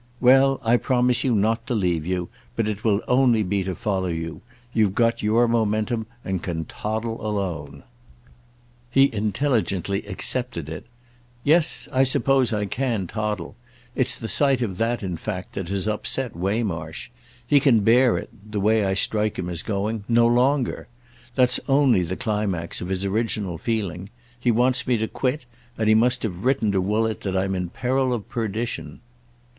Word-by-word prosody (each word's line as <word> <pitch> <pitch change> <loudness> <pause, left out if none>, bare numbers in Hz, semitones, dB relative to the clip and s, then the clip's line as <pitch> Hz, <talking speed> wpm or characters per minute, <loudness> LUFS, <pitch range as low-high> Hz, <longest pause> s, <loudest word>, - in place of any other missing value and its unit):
"Well, 135 +2 +5
I 115 +1 +4
promise 125 -1 +1
you 125 -4 +2
not 110 +2 +2
again - - -31
to 125 - -1
leave 90 -6 0
you, 90 -1 -2 0.3
but 115 - 0
it 105 0 -3
will 105 -3 +2
only 125 -4 +4
be 100 0 -1
to 95 -1 -3
follow 95 -2 -1
you. 80 -1 -4 0.3
You've 105 -4 +2
got 115 0 +2
your 115 +3 +3
momentum 110 0 0 0.2
and 95 -2 -2
can 80 -2 -3
toddle 110 +5 -4
alone." 85 -10 -3 1.1
He 135 +2 +4
intelligently 105 - 0
accepted 105 - -2
it. 80 +7 -7 0.6
"Yes—I 150 -3 +2
suppose 135 -1 +2
I 105 -2 0
can 115 -2 -1
toddle. 105 -2 -3 0.4
It's 130 -1 +1
the 115 - -5
sight 135 0 +2
of 95 -5 -4
that 115 0 0
in 90 -3 -3
fact 90 +1 -5
that 95 -3 -5
has 100 +1 -1
upset 110 +2 -2
Waymarsh. 90 -4 -3 0.4
He 145 +3 +5
can 130 -6 +4
bear 120 +3 +4
it—the 105 +1 -7
way 110 +2 +3
I 95 -1 0
strike 105 +1 0
him 90 -1 -3
as 85 -1 -3
going—no 110 +3 0
longer. 125 +2 +1 0.5
That's 125 -1 +4
only 135 -7 +4
the 90 +1 -2
climax 105 -6 -2
of 90 - -5
his 95 0 -2
original 100 -4 -1
feeling. 100 -4 -3 0.3
He 120 - 0
wants 125 +3 +2
me 125 -2 +3
to 110 0 -1
quit; 130 +3 -2 0.3
and 110 - 0
he 110 - +6
must 120 +3 +3
have 95 -3 -4
written 125 -5 +2
to 95 -1 +1
Woollett 110 +3 0
that 95 -1 -2
I'm 95 +1 0
in 90 -2 -2
peril 130 +5 0
of 110 -2 -7
perdition." 115 0 -3
110 Hz, 165 wpm, -23 LUFS, 95-120 Hz, 1.1 s, he